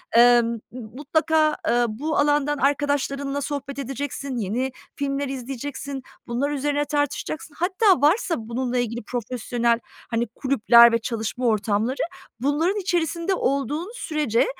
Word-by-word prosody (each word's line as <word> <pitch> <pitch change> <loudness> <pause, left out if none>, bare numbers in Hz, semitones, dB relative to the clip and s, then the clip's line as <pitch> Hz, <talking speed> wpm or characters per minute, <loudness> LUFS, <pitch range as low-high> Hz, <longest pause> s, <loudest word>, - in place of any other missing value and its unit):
emm, 240 -1 +6 0.2
m 250 +1 -8
mutlaka, 305 +6 +1
eee, 240 0 +3
bu 290 +9 -2
alandan 295 0 +2
arkadaşlarınla 280 0 0
sohbet 280 -1 -4
edeceksin, 275 0 -4
yeni 235 +6 -1 0.2
filmler 280 0 -2
izleyeceksin, 270 +1 -5 0.2
bunlar 260 +5 -1
üzerine 290 +1 0
tartışacaksın. 290 +1 -2
Hatta 375 - +3
varsa 335 +3 +3
bununla 240 +2 -3
ilgili 235 -1 -2
profesyonel, 235 0 -1 0.3
hani, 235 0 -1
kulüpler 235 -1 +5
ve 230 - +2
çalışma 230 +2 -3
ortamları, 220 +3 +1 0.4
bunların 320 - +1
içerisinde 345 -1 0
olduğun 290 - -1
sürece 300 - +1
275 Hz, 120 wpm, -24 LUFS, 240-295 Hz, 0.4 s, emm